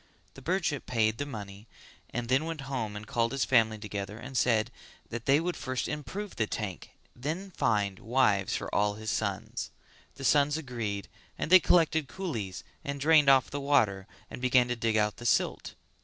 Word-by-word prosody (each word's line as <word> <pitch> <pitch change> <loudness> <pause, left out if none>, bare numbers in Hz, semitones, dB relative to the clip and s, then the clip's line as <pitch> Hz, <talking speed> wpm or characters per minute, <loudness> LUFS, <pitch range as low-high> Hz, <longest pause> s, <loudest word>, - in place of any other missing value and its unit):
The 135 - -13
merchant 175 -6 0
paid 110 -2 +1
the 145 - -2
money 105 -4 -8 0.4
and 120 0 -4
then 135 +5 +2
went 165 -3 -4
home 130 -6 -3
and 105 +1 -7
called 115 +1 0
his 135 - +1
family 110 -4 +3
together 105 -1 -5
and 130 +3 -9
said 115 -3 +2 0.4
that 120 0 -6
they 140 +2 +5
would 175 +2 -2
first 130 -1 -3
improve 150 - -5
the 110 - +1
tank 105 -5 -5 0.2
and 120 - -20
then 180 +7 -3
find 105 - 0
wives 110 -5 +2
for - - -5
all 105 0 +2
his 110 0 -4
sons. 110 +3 -3 0.5
The 135 - -9
sons 145 +2 +4
agreed 115 -9 -4 0.3
and - - -3
they 185 - +10
collected 160 -4 +3
coolies 115 - -5 0.2
and 140 0 -4
drained 150 0 +5
off 135 -2 +5
the 145 - -3
water 105 -9 +2 0.2
and - - -9
began 125 -1 +4
to 120 - 0
dig 115 -1 0
out 105 -1 +1
the 120 - -9
silt. - - 0
120 Hz, 185 wpm, -29 LUFS, 110-145 Hz, 0.5 s, they